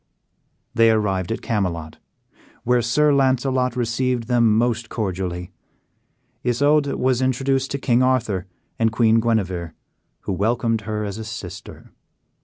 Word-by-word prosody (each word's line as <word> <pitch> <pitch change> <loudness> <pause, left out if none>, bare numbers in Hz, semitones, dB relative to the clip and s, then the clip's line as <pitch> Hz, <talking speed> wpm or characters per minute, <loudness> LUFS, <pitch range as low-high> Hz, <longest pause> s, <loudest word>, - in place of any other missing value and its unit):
They 115 -1 +5
arrived 100 -4 0
at 115 - -3
Camelot, 85 -8 -2 0.6
where 125 0 +2
Sir 145 +6 +3
Launcelot 130 -2 +1
received 125 0 0
them 115 -2 +3
most 115 -1 0
cordially. 90 -4 -3 0.9
Isoude 145 +4 +2
was 130 0 +1
introduced 130 +1 0
to 140 - -2
King 125 -2 +2
Arthur 115 -8 +1 0.3
and 115 -1 +2
Queen 115 -1 +3
Guenever, 95 -8 -1 0.5
who - - -3
welcomed 115 +3 0
her 105 0 -2
as 100 +2 -5
a - - -5
sister. 110 -5 -9
115 Hz, 125 wpm, -22 LUFS, 105-130 Hz, 0.9 s, They